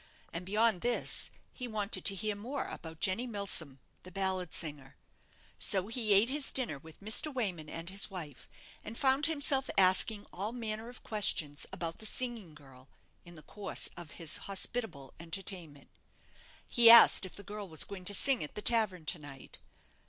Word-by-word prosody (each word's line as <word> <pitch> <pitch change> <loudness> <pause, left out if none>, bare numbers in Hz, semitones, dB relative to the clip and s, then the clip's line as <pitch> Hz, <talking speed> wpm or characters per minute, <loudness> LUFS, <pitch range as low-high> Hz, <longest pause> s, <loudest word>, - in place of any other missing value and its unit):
And 180 +2 -6
beyond 210 -2 +2
this, 240 0 +1 0.2
he 250 - -6
wanted 215 -2 -2
to 200 - +5
hear 210 +2 -2
more 250 +7 -5
about 160 -1 -9
Jenny 210 +7 0
Milsom, 195 - -1 0.2
the 185 - -9
ballad 190 -2 -2
singer. 145 -4 -4 0.6
So 195 0 +3
he 225 -3 +2
ate 205 +4 +5
his 275 +2 +1
dinner 235 - -2
with 160 +4 -15
Mr. 220 +9 +2
Wayman 185 - -3
and 165 +2 -6
his 195 +1 -1
wife, 165 -8 -8 0.3
and 225 +2 -8
found 275 +2 +2
himself 285 -4 0
asking 195 +3 +4
all 205 +5 -4
manner 225 -1 -4
of 245 - -11
questions 155 -9 0
about 165 -1 -5
the 220 - -1
singing 225 -10 -4
girl 135 -2 -17 0.4
in 175 0 -13
the 155 - -14
course 205 -1 -1
of 175 -3 -10
his 165 -3 0
hospitable 195 - -2
entertainment. 170 -4 -6 0.8
He 235 -1 +6
asked 235 -3 +9
if 185 - -7
the 200 - -10
girl 205 0 -8
was 160 -2 +4
going 190 -2 -9
to 205 - +4
sing 270 - +3
at 150 - -9
the 210 - -6
tavern 215 -8 +1
to 170 +2 -2
night. 140 -3 -13
195 Hz, 175 wpm, -31 LUFS, 165-230 Hz, 0.8 s, asked